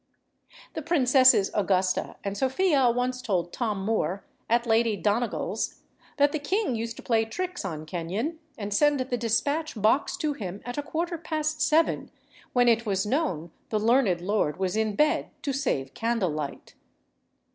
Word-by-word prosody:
The 315 Hz, -, -4 dB
princesses 260 Hz, -, +5 dB
Augusta 190 Hz, -2 st, +1 dB
and 200 Hz, 0 st, -3 dB
Sophia 270 Hz, -, +2 dB
once 250 Hz, +1 st, -1 dB
told 180 Hz, -8 st, -1 dB
Tom 210 Hz, -6 st, -2 dB
Moore, 200 Hz, -3 st, -1 dB, 0.2 s
at 235 Hz, +1 st, +2 dB
Lady 225 Hz, -2 st, +2 dB
Donegall's 220 Hz, +5 st, -1 dB, 0.3 s
that 285 Hz, 0 st, +4 dB
the 310 Hz, -, -2 dB
king 375 Hz, -, 0 dB
used 230 Hz, +1 st, -4 dB
to -, -, -10 dB
play 225 Hz, -2 st, +2 dB
tricks 360 Hz, +11 st, -4 dB
on 155 Hz, -5 st, -5 dB
Kenyon 185 Hz, -, -3 dB, 0.2 s
and 205 Hz, -1 st, -4 dB
send 295 Hz, +4 st, +3 dB
the 255 Hz, -1 st, -1 dB
despatch 245 Hz, +5 st, -1 dB
box 290 Hz, -, +2 dB
to 305 Hz, -4 st, -1 dB
him 195 Hz, -7 st, -6 dB
at 245 Hz, +3 st, -4 dB
a -, -, 0 dB
quarter 335 Hz, +3 st, -3 dB
past 310 Hz, -1 st, -2 dB
seven, 315 Hz, +2 st, +2 dB, 0.4 s
when 245 Hz, -1 st, +3 dB
it 230 Hz, -1 st, +4 dB
was 195 Hz, -3 st, 0 dB
known 210 Hz, -, -1 dB, 0.2 s
the 215 Hz, -, 0 dB
learned 220 Hz, -5 st, +3 dB
lord 185 Hz, -5 st, 0 dB
was 190 Hz, +1 st, -1 dB
in 220 Hz, -1 st, 0 dB
bed 300 Hz, +5 st, +2 dB
to 280 Hz, -, -1 dB
save 140 Hz, -, -1 dB
candlelight. 185 Hz, -11 st, -2 dB
235 Hz, 155 wpm, -27 LUFS, 200-290 Hz, 0.4 s, princesses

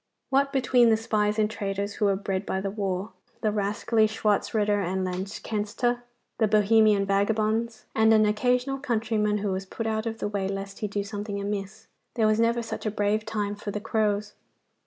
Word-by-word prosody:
What 275 Hz, +1 st, +3 dB
between 255 Hz, -3 st, +4 dB
the 220 Hz, -, +4 dB
spies 210 Hz, -1 st, 0 dB
and 215 Hz, -1 st, +3 dB
traitors 200 Hz, -1 st, -3 dB
who 210 Hz, -, 0 dB
were 200 Hz, -1 st, +3 dB
bred 195 Hz, -1 st, -2 dB
by 190 Hz, -, -2 dB
the 195 Hz, 0 st, -3 dB
war, 195 Hz, -1 st, -2 dB, 0.3 s
the 215 Hz, -, +1 dB
rascally 210 Hz, +2 st, +1 dB
Schwartzritter 210 Hz, -1 st, +1 dB
and 185 Hz, +1 st, -1 dB
Lanzknechte, 210 Hz, +5 st, -2 dB, 0.4 s
the 220 Hz, -, +4 dB
Bohemian 215 Hz, -1 st, +4 dB
vagabonds, 215 Hz, +3 st, 0 dB
and 220 Hz, 0 st, +4 dB
an 215 Hz, -1 st, +5 dB
occasional 250 Hz, +5 st, +1 dB
countryman 220 Hz, -5 st, 0 dB
who 205 Hz, -1 st, -1 dB
was 190 Hz, +1 st, -3 dB
put 225 Hz, -, -5 dB
out 220 Hz, 0 st, -1 dB
of 225 Hz, 0 st, -3 dB
the -, -, -2 dB
way 200 Hz, -2 st, -2 dB
lest 195 Hz, 0 st, -5 dB
he 210 Hz, -, -1 dB
do 205 Hz, 0 st, -2 dB
something 205 Hz, 0 st, -5 dB
amiss, 200 Hz, +1 st, -4 dB, 0.3 s
there 225 Hz, -, +2 dB
was 215 Hz, 0 st, +3 dB
never 235 Hz, +1 st, +2 dB
such 225 Hz, -, -5 dB
a -, -, +2 dB
brave 210 Hz, +1 st, 0 dB
time 210 Hz, -2 st, -2 dB
for 205 Hz, 0 st, -7 dB
the 210 Hz, -, -3 dB
crows. 210 Hz, -1 st, 0 dB
210 Hz, 185 wpm, -26 LUFS, 200-220 Hz, 0.4 s, an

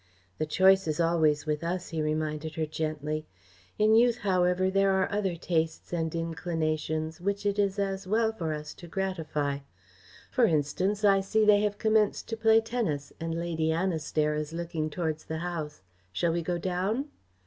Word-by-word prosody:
"The 155 Hz, -, 0 dB
choice 190 Hz, +3 st, +4 dB
is 155 Hz, 0 st, -1 dB
always 160 Hz, -3 st, +2 dB
with 150 Hz, 0 st, -1 dB
us," 175 Hz, +2 st, -3 dB
he 160 Hz, -2 st, -2 dB
reminded 155 Hz, 0 st, -2 dB
her 160 Hz, -, 0 dB
gently. 155 Hz, 0 st, -3 dB, 0.5 s
"In 215 Hz, +1 st, +4 dB
youth, 235 Hz, +1 st, +5 dB
however, 185 Hz, -1 st, +2 dB
there 195 Hz, 0 st, +3 dB
are 190 Hz, -1 st, +2 dB
other 200 Hz, -4 st, 0 dB
tastes 165 Hz, -1 st, -2 dB
and 165 Hz, -1 st, -1 dB
inclinations 160 Hz, -1 st, -2 dB
which 200 Hz, +2 st, -2 dB
it 205 Hz, 0 st, +1 dB
is 200 Hz, 0 st, +1 dB
as 195 Hz, -1 st, -2 dB
well 220 Hz, +2 st, +2 dB
for 170 Hz, -8 st, -3 dB
us 150 Hz, 0 st, -5 dB
to 175 Hz, -, -9 dB
gratify. 160 Hz, -7 st, -2 dB, 0.7 s
For 250 Hz, -3 st, +4 dB
instance, 185 Hz, +5 st, +1 dB
I 195 Hz, -1 st, +5 dB
see 215 Hz, +3 st, +2 dB
they 205 Hz, -1 st, +6 dB
have 205 Hz, -1 st, 0 dB
commenced 215 Hz, -1 st, +2 dB
to 225 Hz, -, -1 dB
play 225 Hz, 0 st, +5 dB
tennis, 220 Hz, -12 st, -2 dB
and 165 Hz, 0 st, -3 dB
Lady 165 Hz, -1 st, -1 dB
Annistair 160 Hz, -3 st, 0 dB
is 150 Hz, +1 st, -3 dB
looking 165 Hz, -2 st, -3 dB
towards 160 Hz, -1 st, -3 dB
the 160 Hz, -, -4 dB
house. 160 Hz, -, -5 dB, 0.3 s
Shall 165 Hz, -, +1 dB
we 170 Hz, -, 0 dB
go 175 Hz, +1 st, -1 dB
down?" 190 Hz, -, -1 dB
170 Hz, 170 wpm, -28 LUFS, 155-195 Hz, 0.7 s, they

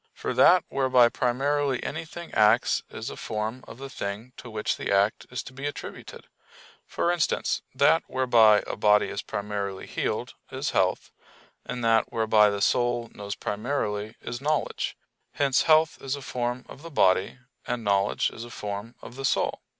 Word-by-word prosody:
For -, -, -3 dB
that -, -, +6 dB
whereby 130 Hz, -3 st, +4 dB
primarily 135 Hz, +2 st, 0 dB
anything 165 Hz, +2 st, -6 dB
acts 110 Hz, +2 st, +4 dB
is -, -, -6 dB
a -, -, -7 dB
form 110 Hz, +4 st, -4 dB
of -, -, -10 dB
the 135 Hz, +1 st, -7 dB
thing 110 Hz, 0 st, -6 dB
to 120 Hz, -, -10 dB
which 110 Hz, -1 st, -1 dB
the -, -, -4 dB
act 100 Hz, +2 st, +2 dB
is 125 Hz, -, -4 dB
to 130 Hz, -, -11 dB
be 135 Hz, +2 st, -4 dB
attributed: 145 Hz, -, -8 dB, 0.6 s
for 170 Hz, -, 0 dB
instance, 175 Hz, -3 st, 0 dB
that -, -, +4 dB
whereby 115 Hz, -5 st, +4 dB
a -, -, -4 dB
body 105 Hz, 0 st, +3 dB
is 100 Hz, -, -4 dB
primarily 100 Hz, -2 st, -4 dB
healed -, -, -3 dB, 0.2 s
is -, -, -2 dB
health, -, -, 0 dB, 0.5 s
and 125 Hz, -1 st, -5 dB
that 115 Hz, -1 st, +3 dB
whereby 110 Hz, -2 st, +4 dB
the 100 Hz, 0 st, -3 dB
soul 120 Hz, -1 st, +1 dB
knows 100 Hz, -1 st, -6 dB
primarily 105 Hz, -2 st, -3 dB
is 120 Hz, +2 st, -6 dB
knowledge; 150 Hz, +1 st, -1 dB, 0.4 s
hence 140 Hz, -2 st, +2 dB
health 155 Hz, 0 st, +4 dB
is 135 Hz, +1 st, -2 dB
a 140 Hz, -, -9 dB
form 125 Hz, 0 st, -3 dB
of -, -, -12 dB
the 165 Hz, -, -9 dB
body, 95 Hz, -, +2 dB, 0.3 s
and 120 Hz, -1 st, -2 dB
knowledge 100 Hz, -1 st, +1 dB
is 115 Hz, -, -8 dB
a 120 Hz, -, -9 dB
form 105 Hz, +1 st, -6 dB
of -, -, -10 dB
the 135 Hz, -, -6 dB
soul. -, -, 0 dB
120 Hz, 170 wpm, -26 LUFS, 105-135 Hz, 0.6 s, that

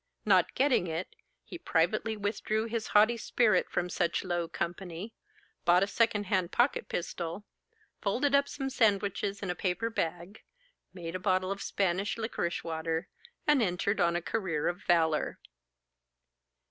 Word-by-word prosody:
—Not -, -, +4 dB
getting 260 Hz, -9 st, +3 dB
it, 165 Hz, +3 st, -4 dB, 0.3 s
he 350 Hz, -, -9 dB
privately 215 Hz, -, +1 dB
withdrew 215 Hz, +1 st, -1 dB
his 230 Hz, -1 st, -3 dB
haughty 215 Hz, +3 st, +4 dB
spirit 215 Hz, -4 st, +2 dB
from 175 Hz, -, -1 dB
such 175 Hz, -1 st, 0 dB
low 175 Hz, -2 st, -1 dB
company, 175 Hz, +5 st, -5 dB, 0.5 s
bought 175 Hz, +2 st, +5 dB
a -, -, 0 dB
second 215 Hz, -1 st, +2 dB
hand 185 Hz, -3 st, 0 dB
pocket 240 Hz, +4 st, +1 dB
pistol, 170 Hz, +3 st, -4 dB, 0.6 s
folded 260 Hz, +8 st, +1 dB
up 280 Hz, 0 st, +4 dB
some 270 Hz, -1 st, -4 dB
sandwiches 200 Hz, -3 st, +1 dB
in 185 Hz, -, -1 dB
a -, -, -4 dB
paper 190 Hz, +6 st, -1 dB
bag, 175 Hz, +2 st, -3 dB, 0.5 s
made 170 Hz, -3 st, -7 dB
a 185 Hz, -, -3 dB
bottle 185 Hz, 0 st, +1 dB
of 200 Hz, 0 st, -4 dB
Spanish 195 Hz, +2 st, 0 dB
liquorice 220 Hz, -6 st, -2 dB
water, 160 Hz, 0 st, -3 dB, 0.4 s
and 295 Hz, -3 st, +4 dB
entered 200 Hz, +1 st, 0 dB
on 170 Hz, 0 st, +3 dB
a 175 Hz, -, -1 dB
career 175 Hz, -9 st, -1 dB
of 175 Hz, +2 st, -2 dB
valour. 160 Hz, -3 st, +2 dB
190 Hz, 145 wpm, -30 LUFS, 175-220 Hz, 0.6 s, bought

